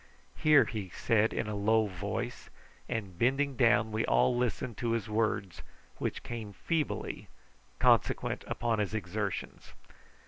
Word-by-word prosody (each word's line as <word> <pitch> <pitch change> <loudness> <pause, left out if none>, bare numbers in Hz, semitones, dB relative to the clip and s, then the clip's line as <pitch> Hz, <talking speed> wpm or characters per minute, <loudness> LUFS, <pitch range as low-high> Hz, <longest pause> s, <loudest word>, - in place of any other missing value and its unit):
"Here!" 155 -2 +5
he 105 -5 -5
said 110 +4 +2
in - - -2
a 105 - -3
low 110 +2 +3
voice; 100 0 -4 0.4
and 95 -6 -4
bending 135 +3 +2
down 120 -2 +3
we 110 +1 0
all 125 - +3
listened 120 -1 -2
to 120 -2 0
his 115 -2 -1
words, 105 -4 -1 0.4
which - - -3
came 110 -4 -6
feebly, 160 - -2 0.5
consequent - - +2
upon 115 -2 -1
his 105 +1 -1
exertions. 100 -1 -4
110 Hz, 135 wpm, -31 LUFS, 100-120 Hz, 0.5 s, Here